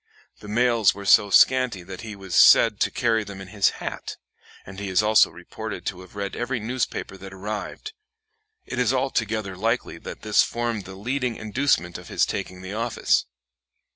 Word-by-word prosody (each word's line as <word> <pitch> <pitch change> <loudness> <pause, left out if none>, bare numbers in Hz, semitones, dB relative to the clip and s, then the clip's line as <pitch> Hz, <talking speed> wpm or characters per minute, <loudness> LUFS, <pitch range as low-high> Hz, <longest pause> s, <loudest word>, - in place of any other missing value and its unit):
The 105 - -12
mails 115 -3 +3
were 100 0 -8
so 100 +1 +5
scanty 125 -3 +4
that 95 +1 -9
he 110 -2 -7
was 95 -2 -9
said - - +6
to - - +2
carry 115 -2 +1
them 100 -2 -9
in 95 -1 -9
his 100 -1 +2
hat, - - -6 0.5
and 95 0 -10
he 100 -1 -4
is 95 +3 +2
also 110 0 +5
reported - - -8
to 90 - -4
have 95 +2 -15
read 100 -1 -4
every 120 +1 -2
newspaper 115 -3 -3
that 95 0 -10
arrived; 105 - -6 0.7
it 125 - -5
is 125 0 +2
altogether 110 -6 -1
likely 115 +6 -2
that - - -9
this - - +4
formed 120 -4 -2
the 95 - -9
leading 125 +4 -2
inducement 110 -6 0
to - - -11
his - - +1
taking 90 0 -5
the 95 +2 -6
office. 115 +2 0
105 Hz, 180 wpm, -24 LUFS, 95-120 Hz, 0.7 s, said